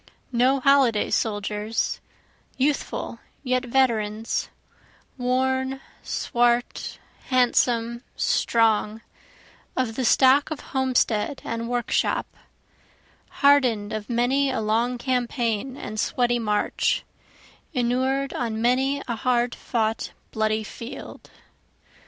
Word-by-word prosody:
No 255 +3 +3
holiday 265 -5 +3
soldiers 210 0 -1 0.6
youthful, 280 +2 -1 0.2
yet 255 -1 0
veterans, 225 -4 0 0.7
Worn, 260 +1 0 0.2
swart, 240 0 0 0.3
handsome, 240 -2 +2
strong, 220 -1 +2 0.8
of 245 -4 0
the 260 - -1
stock 265 +3 +5
of 310 -2 -5
homestead 260 -2 +1
and 230 0 -3
workshop, 245 -1 0 1.2
Harden'd 250 -8 +4
of 215 +1 -5
many 255 +4 +2
a 260 - -1
long 230 +3 0
campaign 245 -1 -1
and 215 - -6
sweaty 240 +1 +1
march, 210 -2 0 0.7
Inured 260 +1 0
on 225 -2 -2
many 265 +4 +1
a 235 - -1
hard 240 0 +1
fought 225 -2 -2 0.2
bloody 215 0 0
field. 230 +3 -9
245 Hz, 90 wpm, -24 LUFS, 225-260 Hz, 1.2 s, stock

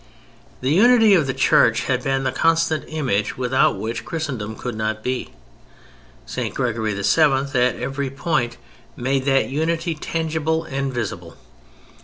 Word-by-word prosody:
The 130 +2 0
Unity 225 +4 +6
of 165 -7 +3
the 130 - -1
Church - - +4
had - - -1
been 135 0 0
the 130 - 0
constant 165 +2 +1
image 130 -10 -1
without 130 +1 +2
which 115 0 -4
Christendom 130 -10 -4
could 125 +1 -5
not 110 0 -3
be; 125 0 -2 1.0
St. - - -4
Gregory 110 -5 -1
VII. 100 - -4 0.2
at 135 -4 +2
every 135 +2 -3
point 135 -3 -1 0.4
made 130 +2 -1
that 135 -1 +2
unity 165 +3 -1
tangible 160 0 -2
and 135 -2 -3
visible. 95 -9 -5
135 Hz, 140 wpm, -21 LUFS, 120-160 Hz, 1.0 s, Unity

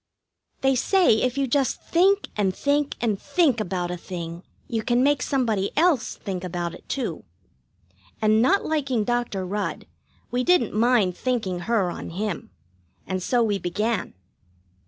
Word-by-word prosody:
They 270 0 +3
say 300 - +3
if 255 +1 0
you 275 - +2
just 270 +1 +1
think 390 +4 +3
and 195 -3 0
think 285 0 0
and 215 -5 0
think 305 -10 +2
about 180 -3 -2
a 180 - -3
thing 170 -1 -6 0.3
you 225 -1 -1
can 240 +2 +2
make 285 -1 +3
somebody 225 -9 0
else 310 -7 +2
think 190 -3 -5
about 175 -1 -3
it, - - -14
too. 230 - -3 1.0
And 215 0 +3
not 375 +11 +3
liking 275 -7 0
Dr. 240 -5 -1
Rudd, 205 +3 -3 0.5
we 250 +1 0
didn't 360 +2 +3
mind 215 -4 +3
thinking 220 -8 -1
her 200 -7 +2
on - - -7
him, 190 0 -4 0.6
and 185 -1 -3
so 240 +5 +2
we 205 -3 0
began. 210 - -2
225 Hz, 155 wpm, -24 LUFS, 190-270 Hz, 1.0 s, They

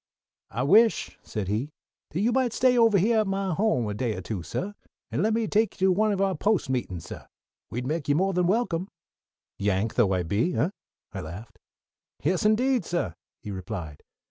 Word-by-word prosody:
"I 120 +5 -2
wish," 215 - +4
said 105 -4 -4
he, 110 +9 -1 0.4
"that 175 - -2
you 230 +4 +3
might 250 -2 +1
stay 255 -1 +3
ovah 230 -4 +5
hyah 220 +4 +3
at 215 - -2
my 195 -1 -1
home 175 - +1
a 105 - -2
day 110 0 -1
or 95 - -5
two, 95 0 -4
suh, 190 - -4 0.4
and - - 0
let 220 - +2
me 225 0 +1
take 215 0 +1
you 190 0 +4
to - - +5
one 215 +3 +2
of 200 - -1
our 195 -1 +2
Post 200 -9 +1
meetin's, 95 -10 -3
suh. - - -9 0.4
We'd 125 +2 -4
make 150 +1 -2
you 145 - +4
more 190 +4 +2
than 180 -1 +2
welcome." 190 -4 0 0.7
"Yank 100 +2 0
though 110 -6 +3
I 90 -1 +1
be, 105 - 0
eh?" 175 - +1 0.4
I - - -4
laughed. 90 +8 -9 0.6
"Yes, 180 +7 +1
indeed, 250 +3 +2
suh," 170 - -2 0.3
he 105 - -5
replied. 90 -5 -6
175 Hz, 200 wpm, -26 LUFS, -, 0.7 s, ovah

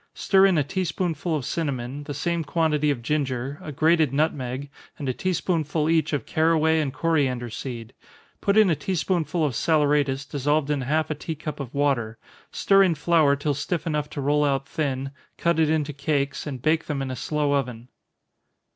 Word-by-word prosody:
Stir 195 0 +4
in 185 -3 +2
a 150 - +3
tea 185 +7 -2
spoonful 165 -1 -2
of 140 -5 -3
cinnamon, 140 -3 -3
the 145 -2 -5
same 170 +3 -1
quantity 150 -1 +1
of 130 -5 -1
ginger, 135 -1 -2
a 150 - -7
grated 155 0 +3
nutmeg, 140 -2 -1 0.3
and 140 - -5
a 130 - 0
tea 185 +8 -1
spoonful 155 -3 0
each 165 -1 +2
of 145 - -2
caraway 160 0 +2
and 140 -3 -2
coriander 130 -7 0
seed 120 -1 -6 0.5
put 200 +1 +2
in 210 -4 +6
a - - +3
tea 190 +5 -3
spoonful 170 0 0
of 140 - -1
saleratus, 145 -1 +1
dissolved 145 +1 0
in 145 -2 0
half 155 +5 0
a - - +2
tea 155 +2 -5
cup 150 0 -6
of 140 -1 -7
water, 125 -6 0 0.3
stir 195 0 +4
in 180 -4 +3
flour 155 -2 +3
till 145 +1 -1
stiff 145 +5 -3
enough 150 -2 -1
to 145 - -5
roll 145 +2 +2
out 135 -2 0
thin, 135 -4 -2 0.3
cut 170 -1 +1
it 160 -1 +3
into 155 -2 0
cakes, 140 0 -1
and 130 -4 -6
bake 160 +1 +2
them 140 -3 -2
in 130 - -4
a - - -3
slow 145 +3 -1
oven. 125 -4 -2
150 Hz, 195 wpm, -24 LUFS, 140-160 Hz, 0.5 s, in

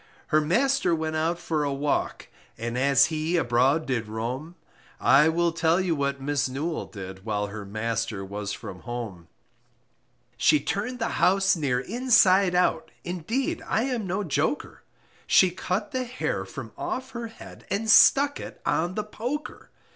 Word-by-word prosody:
Her 155 - +4
master 240 - +2
went 160 0 -3
out 165 +2 0
for 160 -3 -2
a 145 - -1
walk, 140 +1 -2 0.3
And 115 +1 -4
as 140 +1 +4
he 160 +3 0
abroad 135 +2 +2
did 120 -4 -2
roam, 125 +10 -5 0.4
I 150 +3 +5
will 170 +1 +1
tell 165 +1 +2
you 185 -3 +1
what 140 -1 -1
Miss 140 -1 -1
Newall 155 +5 -3
did, 95 -2 -9
While 105 -1 -1
her 105 0 -7
master 110 0 -3
was 100 +1 -5
from 100 -4 -7
home; 115 -8 -6 1.1
She 150 +3 +4
turned 210 - -3
the 230 -1 -1
house 195 +1 +4
near 140 -6 0
inside 200 - +3
out, 180 -2 +1
Indeed 185 - -2
I 225 - +1
am 245 -6 -2
no 190 +4 -1
joker, 180 - -2 0.5
She 185 -2 +5
cut 185 +3 -3
the 255 -1 -2
hair 250 +1 -3
from - - -8
off 260 +1 -4
her 235 -2 -5
head, 225 - -13
And 220 +3 -1
stuck 280 +5 +6
it - - -9
on 175 +3 0
the 215 - -1
poker. 245 +8 -6
160 Hz, 160 wpm, -26 LUFS, 125-200 Hz, 1.1 s, stuck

